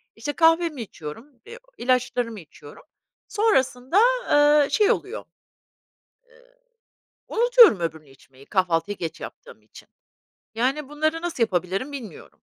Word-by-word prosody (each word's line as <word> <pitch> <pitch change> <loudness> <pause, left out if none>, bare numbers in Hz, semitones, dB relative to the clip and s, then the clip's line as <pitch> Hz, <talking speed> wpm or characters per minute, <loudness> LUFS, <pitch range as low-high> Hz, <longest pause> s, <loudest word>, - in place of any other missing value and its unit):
İşte 290 +6 -5
kahvemi 325 -4 +2
içiyorum, 185 - -9 0.2
eee, 480 - -11 0.2
ilaçlarımı 245 -3 -1
içiyorum, 145 -2 -15 0.4
sonrasında, 270 - 0 0.7
eee, - - -3
şey 420 -2 +3
oluyor 430 +5 -4 1.0
eee, - - -25 0.7
unutuyorum 470 - +5
öbürünü 160 -4 -5
içmeyi, 135 0 -20
kahvaltıyı 185 +1 -1
geç 165 -2 -6
yaptığım 485 0 -11
için. - - -17 0.7
Yani 270 +4 -1
bunları 310 +2 -1
nasıl 340 -9 -1
yapabilirim 190 +7 -2
bilmiyorum. 235 - -10
255 Hz, 110 wpm, -23 LUFS, -, 1.0 s, unutuyorum